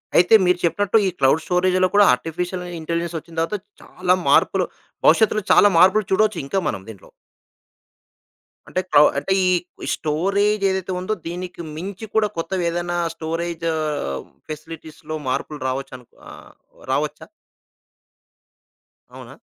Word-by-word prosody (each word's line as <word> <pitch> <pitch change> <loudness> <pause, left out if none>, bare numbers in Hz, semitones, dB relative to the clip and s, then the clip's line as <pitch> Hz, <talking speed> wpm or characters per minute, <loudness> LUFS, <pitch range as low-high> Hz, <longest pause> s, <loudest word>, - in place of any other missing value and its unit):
అయితే 180 +6 +6
మీరు 180 0 +2
చెప్పినట్టు 205 +6 +2
ఈ - - +2
క్లౌడ్ 140 +4 +3
స్టోరేజ్‌లో 185 +1 +2
కూడా 205 0 +7
ఆర్టిఫిషియల్ 175 +7 -3 0.2
ఇంటెలిజెన్స్ 170 +1 -3
వచ్చిన 165 +1 -16
తర్వాత 165 +6 -1 0.2
చాలా 180 0 0
మార్పులు, - - +3 0.4
భవిష్యత్తులో 215 -1 +4
చాలా 205 - +7
మార్పులు 190 +4 +5
చూడొచ్చు 215 +2 +2
ఇంకా 195 +8 -1
మనం 95 -2 -5
దీంట్లో. 105 -4 -12 1.6
అంటే 185 - -1
క - - +1 0.2
అంటే 190 +7 0
ఈ 180 -1 -1
స్టోరేజ్ 200 +7 0
ఏదైతే 190 0 -2
ఉందో 185 +4 -2
దీనికి 180 +1 -6
మించి 195 +6 -6
కూడా 220 -1 +3
కొత్తది 175 +2 -2
ఏదైనా 175 +1 -2 0.2
స్టోరేజ్ 165 +1 -4 0.8
ఫెసిలిటీస్‌లో 155 0 -8
మార్పులు 145 +3 -3
రావచ్చనుకో 130 -2 -6 0.2
ఆహ్, - - -14 0.4
రావచ్చా? 150 +2 -2 1.9
అవునా? - - -11
175 Hz, 120 wpm, -21 LUFS, 160-190 Hz, 1.9 s, కూడా